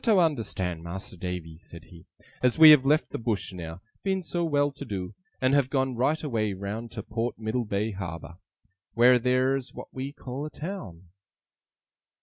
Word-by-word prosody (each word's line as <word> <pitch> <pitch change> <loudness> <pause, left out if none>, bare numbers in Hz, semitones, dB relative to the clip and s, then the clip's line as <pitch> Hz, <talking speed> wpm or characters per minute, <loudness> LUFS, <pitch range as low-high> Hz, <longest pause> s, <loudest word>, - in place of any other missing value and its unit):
'You 225 - +4
are - - +5
to 165 -4 +4
understan', 95 - -3
Mas'r 85 +3 -7
Davy,' 85 -3 -5
said 85 -2 -12
he, 85 0 -16 0.3
'as 125 +2 +2
we 160 -1 +11
have 135 -3 +6
left 150 +2 +3
the - - -4
Bush 110 -4 -2
now, 85 0 -7 0.2
being 190 -1 -1
so 175 +1 -2
well 145 -3 +2
to 140 - -9
do; 95 -3 -5 0.3
and 130 +1 +2
have 140 -2 +3
gone 130 -1 0
right 150 +6 +1
away 110 -8 0
round 100 +5 -5
to 110 -3 -5
Port 115 +3 -3
Middlebay 110 -1 -1
Harbour, 85 -3 -7 0.6
wheer 125 +1 +6
theer's 130 +2 +1
what - - -9
we 130 +2 -4
call 135 -1 -6
a - - -7
town. 105 - -7
120 Hz, 180 wpm, -27 LUFS, 95-140 Hz, 0.6 s, we